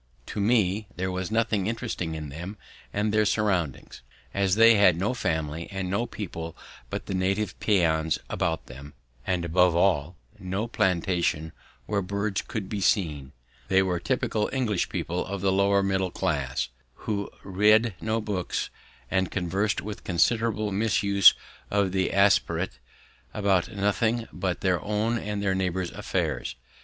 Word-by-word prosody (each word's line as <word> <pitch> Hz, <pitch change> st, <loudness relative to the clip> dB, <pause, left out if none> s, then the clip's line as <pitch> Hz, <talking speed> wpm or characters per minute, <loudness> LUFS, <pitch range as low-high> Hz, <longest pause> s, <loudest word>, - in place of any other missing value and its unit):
To -, -, -5 dB
me 105 Hz, -2 st, +2 dB
there 95 Hz, +1 st, -2 dB
was 90 Hz, -1 st, -3 dB
nothing 110 Hz, -3 st, +1 dB
interesting 110 Hz, -8 st, -3 dB
in 75 Hz, -2 st, -6 dB
them 90 Hz, +9 st, -7 dB, 0.3 s
and 105 Hz, +1 st, 0 dB
their 110 Hz, 0 st, +4 dB
surroundings, 95 Hz, -, -1 dB, 0.3 s
as 100 Hz, -1 st, +2 dB
they 115 Hz, +1 st, +7 dB
had 100 Hz, -5 st, +5 dB
no 100 Hz, +8 st, 0 dB
family 80 Hz, -7 st, -2 dB
and 95 Hz, -2 st, -3 dB
no 115 Hz, +5 st, 0 dB
people 85 Hz, -5 st, -6 dB, 0.3 s
but -, -, -4 dB
the -, -, -4 dB
native 95 Hz, +2 st, -1 dB
peons 80 Hz, -6 st, +2 dB
about 80 Hz, -2 st, -1 dB
them, 70 Hz, +3 st, -11 dB, 0.3 s
and, 90 Hz, -2 st, 0 dB
above 90 Hz, +1 st, +3 dB
all, 85 Hz, -2 st, +2 dB, 0.2 s
no 95 Hz, +3 st, -2 dB
plantation 85 Hz, -6 st, 0 dB, 0.3 s
where 100 Hz, +5 st, 0 dB
birds 100 Hz, +1 st, -2 dB
could 105 Hz, -4 st, -5 dB
be 105 Hz, 0 st, -3 dB
seen. 75 Hz, -9 st, +1 dB, 0.4 s
They 95 Hz, 0 st, +4 dB
were 90 Hz, -2 st, 0 dB
typical 115 Hz, 0 st, 0 dB
English 115 Hz, -9 st, 0 dB
people 90 Hz, +2 st, -2 dB
of 100 Hz, -1 st, -5 dB
the 95 Hz, -1 st, +2 dB
lower 100 Hz, +1 st, +3 dB
middle 95 Hz, -1 st, 0 dB
class, 70 Hz, -7 st, -1 dB, 0.4 s
who 100 Hz, -2 st, -2 dB
read 105 Hz, +3 st, +4 dB
no 110 Hz, +1 st, 0 dB
books 100 Hz, -5 st, -3 dB, 0.4 s
and 95 Hz, -2 st, +1 dB
conversed, 100 Hz, +3 st, -1 dB
with 105 Hz, 0 st, -7 dB
considerable 110 Hz, +3 st, +1 dB
misuse 100 Hz, -1 st, +5 dB, 0.3 s
of 100 Hz, -2 st, +1 dB
the 95 Hz, 0 st, 0 dB
aspirate, 95 Hz, -7 st, +2 dB, 0.6 s
about 100 Hz, -1 st, +1 dB
nothing 110 Hz, +3 st, 0 dB
but 90 Hz, -1 st, -2 dB
their 90 Hz, -2 st, +1 dB
own 110 Hz, +3 st, 0 dB
and 105 Hz, -1 st, -3 dB
their 95 Hz, -1 st, +2 dB
neighbours' 95 Hz, -1 st, -1 dB
affairs. 80 Hz, -11 st, -2 dB
95 Hz, 150 wpm, -26 LUFS, 90-105 Hz, 0.6 s, they